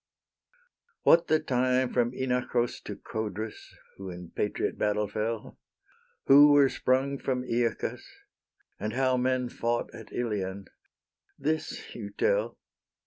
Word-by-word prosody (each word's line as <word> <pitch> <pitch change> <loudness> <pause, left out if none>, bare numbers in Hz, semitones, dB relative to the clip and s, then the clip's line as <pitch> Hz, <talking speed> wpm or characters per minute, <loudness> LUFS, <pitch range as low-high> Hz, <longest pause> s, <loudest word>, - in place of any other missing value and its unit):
What 170 0 +6
the 155 - +3
time 130 -3 +1
from 120 -1 +2
Inachus 125 -2 -1
To - - -5
Codrus, 110 0 -6 0.2
who 95 -1 -7
in 90 -1 -9
patriot 105 - -1
battle 105 0 0
fell, 110 +2 -4 0.7
Who 145 +2 +8
were 140 -2 +6
sprung 135 +2 0
from 125 -2 -1
Aeacus, 115 -2 -1 0.8
And 105 +2 -3
how 130 0 +2
men 130 0 +1
fought 120 0 -2
at - - -11
Ilion, 100 -5 -3 0.7
this 155 +3 -3
you - - -6
tell. - - 0
125 Hz, 120 wpm, -28 LUFS, 110-130 Hz, 0.8 s, Who